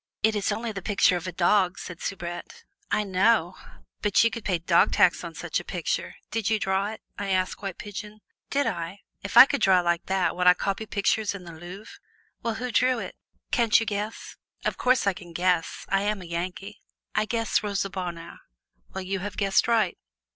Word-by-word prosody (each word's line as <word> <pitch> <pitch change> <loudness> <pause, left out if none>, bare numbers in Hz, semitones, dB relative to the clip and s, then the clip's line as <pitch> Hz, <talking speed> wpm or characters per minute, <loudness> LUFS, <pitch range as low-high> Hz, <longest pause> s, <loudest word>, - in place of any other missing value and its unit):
"It 220 0 +4
is 205 0 0
only 225 +2 -2
the 195 -2 -6
picture 195 -2 +3
of 175 0 -4
a - - -3
dog," 185 +1 +2
said 180 -1 -8
Soubrette. 175 - -6 0.3
"I 210 - +1
know; 190 -2 +2 0.5
but 210 0 +4
you 230 - +3
should 230 - -5
pay 185 -3 +1
dog 165 - +3
tax - - +4
on - - -7
such - - -2
a - - -8
picture - - -3 0.2
did 225 -2 -1
you 220 - +3
draw 195 0 0
it?" 220 +1 -7 0.2
I 200 -1 -3
asked 185 0 0
White 195 -3 -5
Pigeon. 210 +1 -8 0.3
"Did 285 +1 +1
I! 190 -2 -4 0.2
If 200 +4 -3
I 255 - +13
could 280 0 -2
draw 185 -2 +5
like 175 -1 0
that, 190 -1 +1
would 180 0 +1
I 180 - +8
copy 200 +4 -2
pictures 205 0 0
in 190 - -8
the 170 - -9
Louvre?" 175 +6 -10 0.4
"Well, 230 -1 -2
who 250 +2 -4
drew 255 +3 +3
it?" - - -6 0.4
"Can't 230 -2 +4
you 225 - -2
guess?" 210 +1 -4 0.3
"Of - - 0
course 250 -2 +2
I 200 - +3
can 175 -2 -12
guess. 175 -1 0
I 195 0 +2
am 205 0 -1
a - - -10
Yankee 180 +4 -5 0.3
I - - +1
guess 230 0 0
Rosa 200 -2 -2
Bonheur." 175 -3 -6 0.6
"Well, 190 - -3
you 195 +1 -2
have 200 +1 -6
guessed 195 0 +2
right." 220 -6 +2
200 Hz, 205 wpm, -26 LUFS, 180-220 Hz, 0.6 s, I